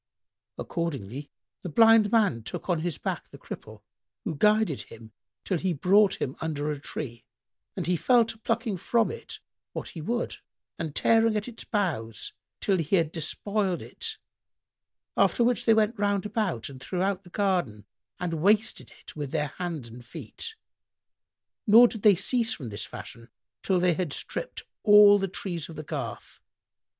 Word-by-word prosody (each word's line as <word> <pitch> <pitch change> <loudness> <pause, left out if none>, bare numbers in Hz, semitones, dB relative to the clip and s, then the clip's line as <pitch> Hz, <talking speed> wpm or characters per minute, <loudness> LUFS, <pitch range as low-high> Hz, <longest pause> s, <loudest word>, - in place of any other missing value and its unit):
Accordingly 140 - -4 0.3
the 180 - -5
Blind 225 +4 +6
man 205 - +3
took 110 - -7
on 175 -3 +1
his 170 -1 -2
back - - -4
the - - -12
Cripple 110 -1 -10 0.4
who - - -2
guided 210 -1 +2
him 110 -1 -12 0.3
till 185 -4 -1
he 185 0 0
brought 195 +6 +4
him 130 - -2
under 150 -2 -2
a 145 - -4
tree, 120 -5 -6 0.5
and - - -3
he 180 - +2
fell 240 +6 +4
to 225 0 -7
plucking 230 -2 -1
from 225 +5 +1
it 465 - -8 0.4
what - - -5
he 165 - -8
would 235 +9 -2 0.4
and 155 -3 -4
tearing 225 -1 +4
at 210 - -3
its 235 -2 -8
boughs 135 - -2 0.3
till 195 -3 +1
he 165 +4 +1
had 165 -4 +2
despoiled 190 +4 -1
it: 445 -1 -5 1.0
after 240 - +3
which 245 0 +1
they 225 - +6
went 220 0 +2
roundabout 205 - 0
and 130 -2 -11
throughout 185 +3 -1
the 175 - -16
garden 175 - -1 0.3
and 180 -2 -2
wasted 215 +4 +2
it - - -11
with 145 -3 -4
their 150 -2 0
hands 165 -9 -4
and 120 +2 -11
feet, 445 - -7 1.1
nor 230 +4 +9
did 220 -3 -7
they 205 -1 +7
cease 225 +4 +1
from 130 -7 -7
this 100 - -5
fashion, 115 +1 -10 0.3
till 190 -2 +1
they 180 0 +3
had 175 -3 -2
stripped - - -4 0.2
all 205 -1 +8
the 195 - 0
trees 175 -3 -4
of 165 - -9
the 155 - -6
garth. - - -6
185 Hz, 165 wpm, -27 LUFS, 150-215 Hz, 1.1 s, nor